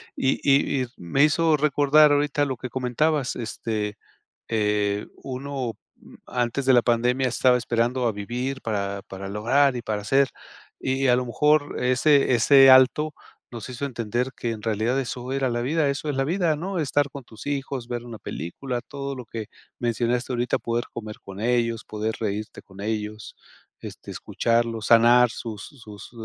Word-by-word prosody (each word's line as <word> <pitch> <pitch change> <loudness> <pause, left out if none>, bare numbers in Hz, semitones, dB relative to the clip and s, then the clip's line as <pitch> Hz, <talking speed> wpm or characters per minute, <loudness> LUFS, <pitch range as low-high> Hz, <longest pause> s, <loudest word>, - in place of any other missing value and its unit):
Y 135 - 0
y 140 -1 +3
y - - -5
me 110 - +1
hizo 155 +1 +3
recordar 150 +1 +4
ahorita 145 0 +1
lo 130 -3 -3
que 125 +1 -6
comentabas, 130 +3 0
este, 110 -3 -4 0.5
eh, 105 -2 0 0.2
uno, 130 -2 -4 0.2
mm, - - -17
antes 125 +2 -1
de 130 - +6
la 120 - +5
pandemia 125 +2 +1
estaba 125 +1 +3
esperando 120 +1 0
a 115 - +1
vivir 125 +6 -4
para 100 -2 -2
para 95 -1 -8
lograr, 125 +7 +2
y 120 - -4
para 105 -2 -3
hacer. 135 +6 +3 0.5
Y 130 +1 0
a 125 - +5
lo 125 0 -1
mejor 150 +4 +2
ese 130 +2 +3
ese 135 +3 +7
alto, 130 +4 +5 0.4
nos 120 0 -8
hizo 125 +3 -5
entender 120 +1 -2
que 120 - -3
en 110 -2 -8
realidad 115 +4 0
eso 125 0 -5
era 135 -2 0
la 120 0 -1
vida. 150 +3 +1
Eso 145 +2 -4
es 140 - -3
la 135 - +1
vida, 170 -1 +1
¿no? 185 +4 -4
Estar 145 -2 +1
con 140 -3 -9
tus 110 +3 -13
hijos, 135 -3 -3
ver 120 -1 -3
una 115 -3 -9
película, 120 - -5
todo 140 +1 -6
lo 125 -2 -8
que 110 -1 -6 0.3
mencionaste 120 +2 -1
ahorita 120 0 0
poder 120 0 -2
comer 110 -2 -7
con 95 0 -10
ellos, 115 -1 0
poder 110 +1 -3
reírte 105 0 -4
con 95 0 -14
ellos, 105 0 -4 0.4
este, - - -9
escucharlos, 115 -1 -1
sanar 120 +1 +6
sus 110 -3 -7
sus 110 -8 -12
125 Hz, 170 wpm, -24 LUFS, 110-135 Hz, 0.5 s, ese